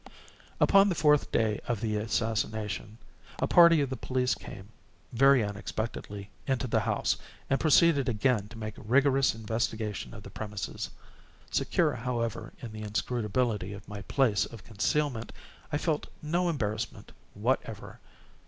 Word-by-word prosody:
Upon 195 +1 +6
the 180 - 0
fourth 150 -2 +3
day 110 -2 +1
of 120 -4 -1
the 110 -1 -1
assassination, 110 -1 -2 0.4
a - - +1
party 170 -3 +7
of 135 -2 -1
the - - -1
police 125 -1 0
came, 95 +2 -9 0.4
very 135 0 +5
unexpectedly, 105 0 -5 0.2
into 130 -1 0
the 115 -2 +2
house, 105 -1 0 0.3
and 135 - +3
proceeded 155 -3 +4
again 110 -2 +1
to 110 - -12
make 110 -1 -5
rigorous 135 +2 +3
investigation 110 - -3
of - - -10
the - - -10
premises. 105 -2 -5 0.6
Secure, - - +2
however, 115 -1 -3
in 115 - -6
the 110 0 -7
inscrutability 105 -1 -1
of 100 -1 -10
my 105 0 -7
place 115 -3 +2
of 115 -5 -11
concealment, 115 +3 -1 0.4
I 145 - +1
felt 155 -1 -1 0.2
no 175 +3 +1
embarrassment 110 -7 -3 0.2
whatever. - - -2
115 Hz, 140 wpm, -29 LUFS, 105-135 Hz, 0.6 s, party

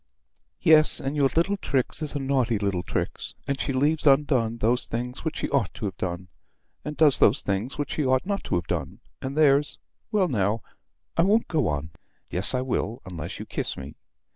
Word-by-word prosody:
Yes, 155 -3 +5
and 135 +2 -3
your 140 -2 +3
little 195 +5 +2
Trix 135 -4 -1
is 155 -1 -2
a - - 0
naughty 130 -4 +1
little 100 -3 -1
Trix, - - -4
and 140 -1 -1
she - - -1
leaves 150 +4 +1
undone 135 -5 +3
those 120 +2 +1
things 125 +2 -4
which 160 -1 -3
she - - -2
ought 135 -9 +1
to - - -5
have 95 - -4
done, 90 0 -4 0.6
and 150 0 -6
does 150 -5 +7
those 115 +8 +4
things 100 +6 -2
which 145 -1 -3
she 155 - -1
ought 130 +4 +2
not 200 0 -2
to - - -1
have 85 -1 -1
done, 80 -6 -3 0.2
and 135 +2 -5
there's 145 -1 +3 0.3
well 205 -4 +2
now 105 - 0 0.5
I - - +3
won't 210 +6 +3
go 150 - +1
on. 75 +2 -3 0.4
Yes, 95 +8 +3
I 125 - 0
will, 120 -3 -2
unless 85 -2 -6
you - - -7
kiss - - -4
me." - - -8
130 Hz, 200 wpm, -25 LUFS, 105-150 Hz, 0.6 s, does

